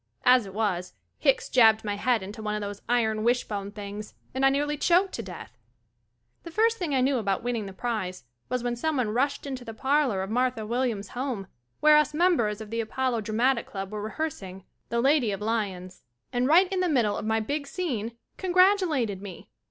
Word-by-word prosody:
As 250 -4 +5
it 190 - -10
was, 185 -5 -1 0.2
Hicks 275 -3 +2
jabbed 220 -3 +5
my 205 -1 -2
head 230 +1 +1
into 205 +3 -8
one 210 -1 -2
of 210 - -3
those 205 0 -6
iron 220 -3 +1
wishbone 210 -4 0
things, 205 0 -8 0.2
and 265 +1 -2
I 270 - +7
nearly 290 +2 0
choked 360 +5 +3
to - - -3
death. 180 - -9 0.9
The - - -9
first 450 +6 +2
thing 320 -7 -1
I 260 - +3
knew 265 0 +2
about 195 -2 -1
winning 235 -4 -2
the - - -7
prize 190 - -3 0.3
was 250 -1 -1
when 240 0 -1
someone 255 -3 0
rushed 280 +5 0
into 260 -3 -5
the 225 -2 -8
parlor 265 -6 +1
of 195 - -6
Mar 250 +2 +3
tha 225 -4 -7
Williams' 230 -3 -1
home, 245 -6 -3 0.4
wher<5 300 0 +8
us 300 - -4
members 270 - +2
of 215 -1 -9
the 230 0 0
Apollo 240 +1 -1
Dra 215 0 -5
matic 250 +1 +2
Club 195 0 -6
were 210 -1 -4
re 215 +1 -5
hearsing 195 - -4 0.3
"The 235 0 0
Lady 270 -3 +3
of 195 - -4
L - - -2
y 220 -3 +1
o - - -8
n 180 0 -9
s," 185 0 -15 0.3
and 245 +1 +1
right 350 +6 +6
in 375 - 0
the 365 -1 +1
middle 230 -8 +2
of - - -4
my 220 +1 +1
big 285 +6 -3
scene, 235 - -3 0.2
congratulated 360 - +2
me. 195 -4 -10
235 Hz, 220 wpm, -27 LUFS, 210-275 Hz, 0.9 s, wher<5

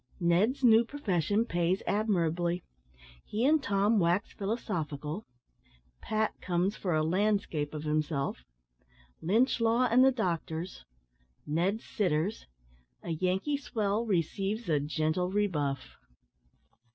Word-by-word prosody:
NED'S 190 +10 +2
NEW 225 -1 +7
PROFESSION 210 - 0
PAYS 175 0 0
ADMIRABLY 175 -4 0 0.6
HE 220 +4 -1
AND 305 +2 +4
TOM 205 -2 +2
WAX 175 +3 +1
PHILOSOPHICAL 175 - -3 0.7
"PAT" 220 0 0
COMES 180 +2 0
FOR 180 -4 -1
A 155 - +2
"LANDSCAPE" 180 -4 0
OF 150 - -5
HIMSELF 150 - -1 0.8
LYNCH 225 +10 +2
LAW 230 +2 +3
AND 250 +2 +6
THE 265 - +6
DOCTORS 170 - -3 0.6
NED'S 180 +8 0
SITTERS 185 0 -1 0.6
A 170 - -4
YANKEE 185 - 0
SWELL 225 -4 -1
RECEIVES 195 +4 -1
A 150 -2 +3
GENTLE 155 +4 -1
REBUFF. 155 -10 -1
190 Hz, 110 wpm, -30 LUFS, 160-220 Hz, 0.8 s, NEW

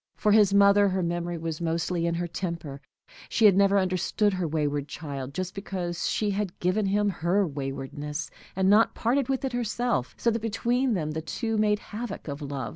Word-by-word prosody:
For 210 - +1
his 205 -2 +6
mother, 200 0 +5
her 185 -1 -1
memory 175 0 -2
was 165 0 -4
mostly 170 +1 -1
in 170 - 0
her 175 +1 -1
temper. 170 -5 -5 0.5
She 225 - +3
had 200 -3 +7
never 200 0 +4
understood 190 +2 +1
her 185 -2 -1
wayward 145 -2 -1
child, 140 -3 -6
just 185 +4 -4
because 185 -3 -3
she 210 -1 0
had 200 -2 -3
given 195 +3 +1
him 205 +1 +2
her 190 +1 +1
waywardness, 145 +1 -5 0.2
and 190 0 +2
not 210 +3 +5
parted 250 +3 +1
with 270 0 0
it 260 - -3
herself, 240 - -1
so 235 - +2
that 230 0 -2
between 240 +3 0
them 155 -4 -2
the 160 +1 -3
two 225 +7 -3
made 210 -1 +3
havoc 220 0 -7
of 145 +1 -5
love. 140 -3 -4
185 Hz, 195 wpm, -27 LUFS, 160-210 Hz, 0.5 s, had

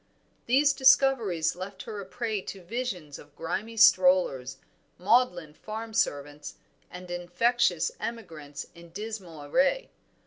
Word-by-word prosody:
These 280 +4 +4
discoveries 260 - +3
left 190 +1 -7
her 210 -2 -6
a 190 - -10
prey 220 -1 -3
to 190 0 -9
visions 180 - -5
of 145 0 -17
grimy 210 +7 -4
strollers, 180 - +4 0.4
maudlin 180 -6 +2
farm 220 +6 -7
servants, 145 -9 -2 0.3
and 180 0 -10
infectious 175 +2 +1
emigrants 160 -11 -7
in 170 -1 -14
dismal 190 -5 -7
array. 275 - +1
190 Hz, 115 wpm, -28 LUFS, 165-230 Hz, 0.4 s, These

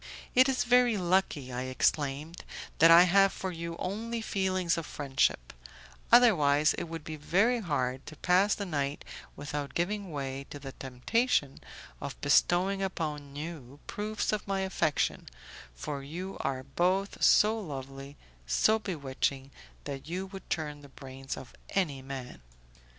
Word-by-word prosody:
"It 255 +2 +6
is 260 - +1
very 245 -2 +4
lucky," 175 -8 0
I 125 +1 -3
exclaimed, 145 +4 -1 0.4
"that 165 - +8
I 170 +1 +10
have 195 +2 +5
for 190 - -4
you 170 0 -5
only 225 +5 -3
feelings 185 -5 0
of 165 -2 -4
friendship; 135 - 0 0.6
otherwise 155 -12 +5
it - - -3
would 165 -2 -7
be 155 0 -6
very 200 +11 +2
hard 135 - -2
to 155 - -8
pass 185 +5 +3
the 200 - -4
night 145 -4 -2 0.3
without 145 0 -5
giving 195 +2 -1
way 135 -1 -4
to - - -7
the 135 -1 -8
temptation 135 - 0 0.4
of - - -6
bestowing 190 +3 +3
upon 150 -7 -4
you 145 -3 -7
proofs 215 +1 -2
of 215 -1 -3
my 195 -1 0
affection, 175 -5 0 0.5
for 140 - -5
you 175 +7 -6
are 130 -1 -2
both 180 +8 0
so 220 +2 +5
lovely, 135 -4 -7 0.3
so 220 - +3
bewitching, 140 -7 -3 0.3
that 140 -1 -6
you 185 +3 -3
would 190 -1 -11
turn 150 -2 -3
the 140 - -14
brains 135 0 -8
of 130 - -10 0.2
any 155 -9 0
man." 130 -2 -7
160 Hz, 145 wpm, -30 LUFS, 140-195 Hz, 0.6 s, I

